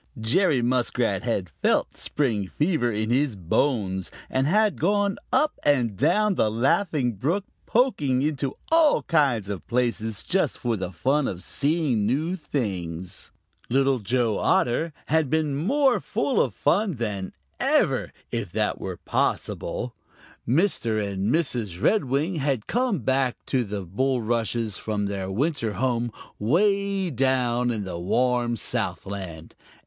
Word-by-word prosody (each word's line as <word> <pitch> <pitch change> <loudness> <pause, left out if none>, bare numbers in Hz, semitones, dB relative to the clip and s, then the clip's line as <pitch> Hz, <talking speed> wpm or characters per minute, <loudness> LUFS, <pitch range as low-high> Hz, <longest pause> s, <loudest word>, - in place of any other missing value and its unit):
Jerry 125 - +2
Muskrat 120 -5 +1
had 100 -8 -2
felt - - +2
the - - -14
spring 115 -9 -1
fever 150 - 0
in 110 +1 -1
his 130 -2 +2
bones 95 - 0 0.2
and 130 +1 +1
had 210 +4 +2
gone 200 +3 +2
up 305 - +2
and 125 -8 +2
down 210 - +3
the 110 - +2
Laughing 130 - +1
Brook, 165 - -1 0.2
poking 145 - +2
into 140 -3 -1 0.2
all 325 -2 +5
kinds 135 - +2
of 100 -3 -6
places 115 -3 -1
just 185 -6 0
for 120 -2 -1
the 95 -3 -4
fun 135 +8 +1
of 90 0 -5
seeing 140 -8 0
new 155 +9 0
things. 95 - -4 0.4
Little 135 0 +2
Joe 115 0 0
Otter 155 +7 +2
had 155 -3 +1
been 155 -2 +1
more 260 - +2
full 270 - 0
of 120 - -1
fun 190 +4 +1
than 105 -5 -3 0.3
ever, - - +2 0.2
if 115 -7 -3
that 105 0 0
were 95 -2 -4
possible. - - -2 0.5
Mr. 125 - +1
and 100 +3 -1
Mrs. 120 - 0
Redwing 155 - +1
had 135 -6 -1
come 240 - 0
back 130 0 +1
to 130 -2 +1
the 100 -2 -4
bulrushes 115 +1 -1
from 105 -2 -2
their 100 -1 -3
winter 120 - -1
home 120 +2 0 0.3
way 195 - +1
down 125 -2 +1
in 110 -4 -2
the 90 -3 -5
warm 120 +5 +1
Southland. 95 -7 -4
125 Hz, 135 wpm, -25 LUFS, 105-155 Hz, 0.5 s, all